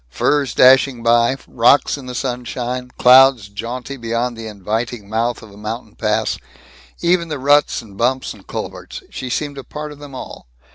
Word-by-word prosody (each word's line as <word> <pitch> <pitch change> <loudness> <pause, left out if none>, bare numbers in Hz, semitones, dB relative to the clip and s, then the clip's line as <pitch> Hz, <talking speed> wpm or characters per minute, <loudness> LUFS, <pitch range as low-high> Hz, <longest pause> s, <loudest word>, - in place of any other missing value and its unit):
Firs 140 - 0
dashing 130 -1 +5
by 120 +2 +3
rocks 120 +4 +3
in 135 -3 -10
the 125 - -6
sunshine 125 0 -3
clouds 130 -4 +6
jaunty 120 +6 -6
beyond 115 +1 -2
the 115 -1 -7
inviting 110 +2 -4
mouth 115 +3 -1
of 110 - -13
a 100 - -15
mountain 110 +1 -6
pass 105 -1 0 0.6
even 170 0 +2
the 150 -2 -4
ruts 145 -1 +3
and 100 -3 -15
bumps 130 +3 0
and - - -18
culverts - - -7
she 130 - -5
seemed 145 +2 -3
a - - -8
part 150 +2 -7
of 145 - -12
them 145 -2 -10
all. 125 - -9
125 Hz, 175 wpm, -19 LUFS, 115-135 Hz, 0.6 s, clouds